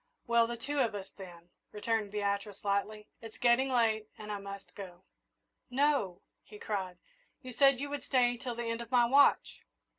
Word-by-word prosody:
"Well, 235 -1 +3
the 235 0 -5
two 285 +5 -3
of 230 -5 +1
us, 195 -2 -7
then," 175 -3 -13 0.2
returned 215 0 -1
Beatrice, 200 -1 -3
lightly. 210 +1 -1
"It's 225 -1 -11
getting 245 +2 +3
late, 220 -4 +1
and 210 0 -7
I 205 - -3
must 200 0 -9
go." 185 -2 -10 0.7
"No!" 255 -9 +1 0.2
he 210 - -13
cried. 190 -4 -4 0.5
"You 255 -1 -8
said 275 0 +4
you 285 +1 -4
would 290 - -4
stay 245 -2 +2
till 245 0 -5
the 235 0 -4
end 230 0 -3
of 235 - -9
my 245 -1 +4
watch!" 280 +4 +4
225 Hz, 180 wpm, -31 LUFS, 200-245 Hz, 0.7 s, said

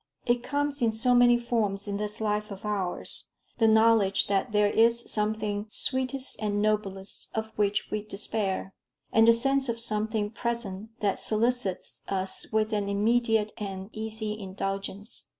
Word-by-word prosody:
It 240 0 +2
comes 285 +1 -1
in 230 -2 +3
so 230 +3 +2
many 245 0 +6
forms 220 -4 -1
in 200 0 -2
this 210 +1 -3
life 210 0 -1
of 200 0 -8
ours 195 -4 -1 0.3
the 225 - +5
knowledge 220 -3 +4
that 200 +4 0
there 210 0 +4
is 230 +1 +4
something 210 -1 -1
sweetest 260 +2 -1
and 205 -1 0
noblest 205 -2 -1
of 220 0 -2
which 205 0 0
we 215 -1 -2
despair, 200 -2 -2 0.4
and 225 0 +6
the - - +10
sense 270 +2 +1
of 230 0 -1
something 215 -2 0
present 225 -3 -4
that 200 -2 +1
solicits 225 -3 -1
us 190 -1 -2
with 220 0 +1
an 205 -1 0
immediate 220 +1 +2
and 195 0 -5
easy 220 -1 -4
indulgence. 195 +2 -4
215 Hz, 150 wpm, -28 LUFS, 205-230 Hz, 0.4 s, the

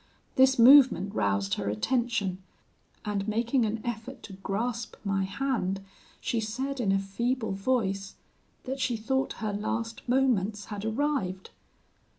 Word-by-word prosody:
This 265 0 +5
movement 245 -6 +7
roused 100 - 0
her 100 -1 -1
attention, 205 - 0 0.6
and 205 -1 -2
making 230 +2 +1
an 220 +2 -2
effort 225 -2 -5
to 200 - -9
grasp 225 +5 -3
my 195 -2 0
hand, 195 -4 -1 0.4
she 235 - -1
said, 260 +6 -3
in 205 -5 +1
a 195 - +3
feeble 225 +5 -1
voice, 195 -2 -1 0.5
that 265 +1 -4
she 245 -3 0
thought 265 +5 -1
her 215 -2 -3
last 225 +2 -3
moments 220 -6 +1
had 205 +1 -5
arrived. 220 -6 -1
220 Hz, 135 wpm, -28 LUFS, 195-250 Hz, 0.6 s, movement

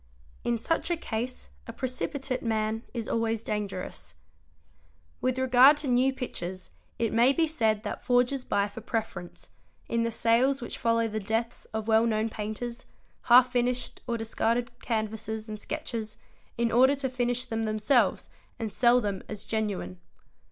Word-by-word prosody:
In 240 -1 +1
such 325 +9 -1
a 345 - +1
case 250 -3 -4 0.2
a - - -5
precipitate 260 +1 -3
man 220 -1 -1
is 230 -3 -4
always 225 -1 0
dangerous. 205 -4 -4 1.1
With 255 0 0
regard 260 +3 +7
to 295 - -3
new 255 +1 +3
pictures 185 -8 -5 0.3
it 230 -2 0
may 235 +4 +5
be 330 +3 +3
said 225 -9 +1
that 210 - -5
forgers 250 +2 +2
buy 200 -4 +1
for 205 - -9
preference, 215 -7 -5 0.4
in 230 - 0
the 230 0 0
sales 235 +5 +3
which 240 - -6
follow 230 0 +2
the 215 0 -3
deaths 225 +3 -2
of 220 0 -5
well 225 +1 +4
known 220 0 +1
painters, 225 +3 -5 0.4
half 250 +1 +7
finished 245 0 -1
or 235 - 0
discarded 230 +2 0
canvases 220 -1 -3
and 215 -1 -6
sketches, 220 +1 -4 0.4
in 235 0 +1
order 260 +4 +5
to 275 -1 -2
finish 245 -1 -1
them 225 -2 -2
themselves 215 +4 +1 0.3
and 225 -4 -4
sell 245 +2 +5
them 200 -3 -2
as 210 -2 -6
genuine. 200 - -2
230 Hz, 155 wpm, -28 LUFS, 220-250 Hz, 1.1 s, regard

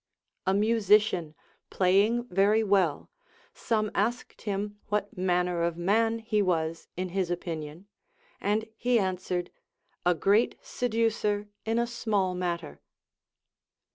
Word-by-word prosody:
A 190 - +4
musician 210 -6 +3 0.3
playing 200 +6 +3
very 200 +4 +3
Avell, 190 -7 +1 0.4
some 215 -2 -1
asked 235 +5 -2
him 205 0 -3
what 205 0 -2
manner 180 -1 +1
of 170 0 0
man 225 +6 +2
he 220 -2 0
was 165 -3 -1
in 185 0 -2
his 185 -1 -1
opinion, 165 -1 -5 0.5
and 210 +2 0
he 245 +1 +2
an 190 -3 0
swered, 180 -1 -3 0.5
A 180 0 +3
great 200 +8 +3
seducer 220 -3 -1 0.2
in 225 +1 0
a 235 - +2
small 215 -6 -1
matter. 170 - -4
200 Hz, 120 wpm, -28 LUFS, 180-220 Hz, 0.5 s, A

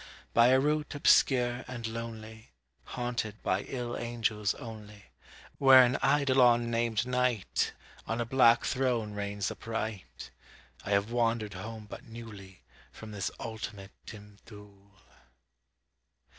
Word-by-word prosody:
By 115 +1 +6
a 130 +1 +5
route 150 +1 -1
obscure 125 -3 +3
and 120 -2 -6
lonely, 110 - -7 0.3
Haunted 120 -4 -3
by 95 +2 0
ill 120 -2 -5
angels 110 -3 -1
only, 105 -4 -10 0.5
Where 135 -1 +8
an 125 +1 +1
Eidolon, 125 -5 +3
named 115 -1 0
NIGHT, 125 -4 0 0.3
On 115 +1 -2
a 120 - 0
black 120 -1 +4
throne 125 -5 -1
reigns 100 -1 -3
upright, 110 -3 -6 0.5
I - - -7
have 100 +2 +1
wandered 115 -3 0
home 110 +3 -8
but - - -10
newly 105 -5 -11 0.3
From 110 -1 -11
this 100 -2 -3
ultimate 105 -3 -7 0.2
dim 105 -1 -12
Thule. 100 -2 -16
115 Hz, 120 wpm, -30 LUFS, 105-120 Hz, 0.5 s, Where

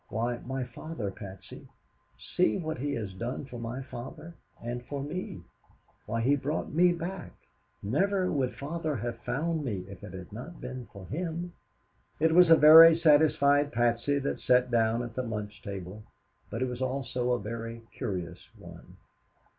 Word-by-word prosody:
Why, 120 +2 -1
my 130 +1 -4
father, 125 -3 -6
Patsy. 95 -1 -11 0.7
See 180 - +3
what 160 -6 -4
he 145 +2 -2
has 105 -4 -4
done 120 +8 -4
for 125 -3 -9
my 120 +3 -5
father, 135 +7 -9 0.3
and 120 +1 -5
for 140 -1 -4
me! 145 - -5 0.6
Why, 115 +2 -1
he 135 +5 +3
brought 145 +3 -3
me 175 +3 +5
back. 175 +2 -5 0.5
Never 185 - +1
would 130 -4 -1
father 155 +1 -3
have 120 0 -4
found 160 +5 -2
me 100 -9 -3
if 100 -2 -11
it 90 - -9
had 95 +1 -9
not 145 +10 -8
been 125 -2 -7
for 100 -1 -10
him." 170 - -4 0.7
It 160 +1 +3
was 180 0 +7
a 165 - +10
very 160 +2 +10
satisfied 145 -2 +4
Patsy 120 +4 +1
that 140 0 -2
sat 125 0 +3
down 115 0 +2
at 120 -2 -7
the 130 - -2
lunch 105 -3 -5
table, 100 +1 -7 0.5
but 115 +3 -2
it - - 0
was 125 0 -5
also 125 -1 -1
a 120 - 0
very 115 +2 -6
curious 90 -3 -4 0.2
one. - - -13
125 Hz, 165 wpm, -29 LUFS, 115-155 Hz, 0.7 s, a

